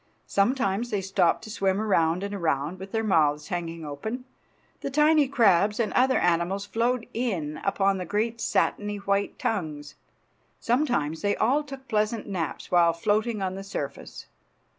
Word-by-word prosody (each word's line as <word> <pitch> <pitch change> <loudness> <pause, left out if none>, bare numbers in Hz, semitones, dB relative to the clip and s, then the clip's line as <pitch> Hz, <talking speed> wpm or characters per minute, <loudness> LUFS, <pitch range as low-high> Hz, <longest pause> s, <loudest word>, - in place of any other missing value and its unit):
Sometimes 225 0 +1
they 210 -3 0
stopped 185 -3 +1
to 215 - -8
swim 195 -2 0
around 180 -4 +2
and 200 0 -4
around 160 -2 -1
with 190 +1 -8
their 225 0 0
mouths 150 -7 +2
hanging 165 -2 -4
open. 220 - -5 0.5
The - - -4
tiny 300 +1 +4
crabs 210 -5 +3
and 225 -3 0
other 260 +1 +3
animals 175 +3 +1
flowed 230 +4 0
in 180 -11 -2
upon 195 -1 +1
the 180 - -4
great 225 +5 -1
satiny 205 0 0
white 200 0 -1
tongues. 150 -8 -3 0.7
Sometimes 235 - 0
they 205 0 +1
all 265 +7 +2
took 270 -2 -10
pleasant 215 +1 0
naps 180 -6 -4
while 170 -2 +5
floating 210 +4 0
on 185 -1 -1
the 195 +1 -6
surface. 145 -8 -6
200 Hz, 155 wpm, -26 LUFS, 170-225 Hz, 0.7 s, while